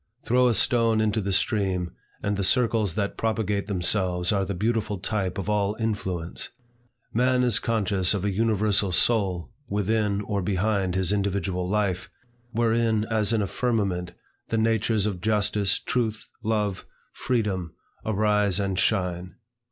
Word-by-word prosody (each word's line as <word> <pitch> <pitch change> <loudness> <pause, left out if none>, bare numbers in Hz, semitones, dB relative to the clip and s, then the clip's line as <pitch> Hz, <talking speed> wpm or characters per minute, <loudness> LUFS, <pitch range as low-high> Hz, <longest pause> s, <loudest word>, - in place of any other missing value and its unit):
Throw 125 +1 +4
a 120 - +2
stone 115 -2 +3
into 110 0 +1
the 100 0 -2
stream, 95 -2 0 0.3
and 100 0 0
the 100 - -2
circles 110 -4 +2
that 100 -1 -2
propagate 105 -3 -1
themselves 90 -2 +1
are 100 -2 +1
the 100 0 -3
beautiful 110 +1 -1
type 95 -1 -2
of 100 - -4
all 105 -1 +1
influence. 95 -7 -2 0.6
Man 125 +2 +2
is 120 -2 +3
conscious 100 -4 +1
of 100 0 -2
a 105 - +1
universal 105 -1 +1
soul 95 -1 +1 0.2
within 105 0 0
or 100 -1 -2
behind 95 0 0
his 95 +1 +1
individual 95 -3 -1
life, 100 -3 -1 0.4
wherein, 115 -2 +1
as 110 -1 +2
in 110 -3 +2
a - - -2
firmament, 100 -8 -1 0.4
the 115 - 0
natures 110 -1 +1
of 95 -5 -3
Justice, 105 -1 +1
Truth, 110 -4 -2
Love, 105 -3 -1 0.3
Freedom, 100 -9 -2 0.3
arise 105 -2 +2
and 95 -2 -1
shine. 90 -4 0
105 Hz, 145 wpm, -25 LUFS, 95-110 Hz, 0.6 s, Throw